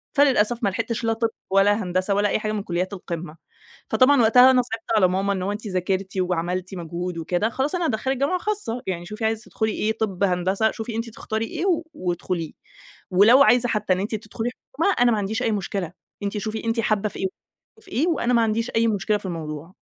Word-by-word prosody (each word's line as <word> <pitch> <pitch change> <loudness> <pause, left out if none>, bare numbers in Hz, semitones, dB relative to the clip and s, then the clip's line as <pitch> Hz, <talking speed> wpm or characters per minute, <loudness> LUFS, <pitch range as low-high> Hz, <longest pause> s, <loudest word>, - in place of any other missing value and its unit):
فللأسف 245 -4 +3
ما 200 - +3
لحقتش 230 +4 -3
لا 225 - +2
طِب 225 0 0 0.2
ولا 205 +2 +3
هندسة 185 +2 0
ولا 205 0 +2
أي - - +1
حاجة 215 0 -2
من 210 -2 -2
كليات 185 +2 -2
القمة. 170 -3 -6 0.5
فطبعًا 265 0 +5
وقتها 250 +3 +7
أنا 255 -1 +4
صعبت 225 -2 -6
على 190 -3 +5
ماما، 195 +2 0
"إن 190 - -3
هو 190 +2 -1
أنتِ 210 +2 -5
ذاكرتِ 190 0 -2
وعملتِ 180 +1 -2
مجهود 175 +1 -5
وكده 175 +6 0
خلاص 270 +7 -1
أنا 350 -1 0
هادخلِك 260 0 -1
جامعة 285 +8 +1
خاصة، 395 - -3
يعني 175 -2 -3
شُوفي 215 +4 -4
عايزه 220 +1 0
تدخُلِي 220 -1 -2
إيه، 215 - 0
طِب، 200 -3 -1
هندسة، 190 +3 +2
شُوفي 220 0 -6
أنتِ 230 +1 -3
تختاري 220 0 -3
إيه 275 - -5 0.3
وادخليه، 175 - -3 0.6
ولو 215 +9 +7
عايزه 245 -2 +4
حتّى 210 -3 0
إن 185 - +1
أنتِ 205 +3 -3
تدخُلِي 220 +2 -4 0.2
حكومة، 335 +8 +2
أنا 245 -1 +5
ما 215 - +1
عنديش 205 +2 -2
أي 225 - +1
مشكلة، 195 -4 -3 0.3
أنتِ 205 +1 -2
شُوفي 215 +2 -4
أنتِ 230 0 0
حابّة 215 -1 +1
في - - -10
إيه، 190 - 0 0.5
وفي 440 - -16
إيه 290 +8 +1
وأنا 265 -7 +1
ما 235 - +4
عنديش 225 +2 0
أي 230 0 +4
مشكلة 210 0 +1
في - - -8
الموضوع." 160 0 -6
215 Hz, 210 wpm, -23 LUFS, 185-230 Hz, 0.6 s, وقتها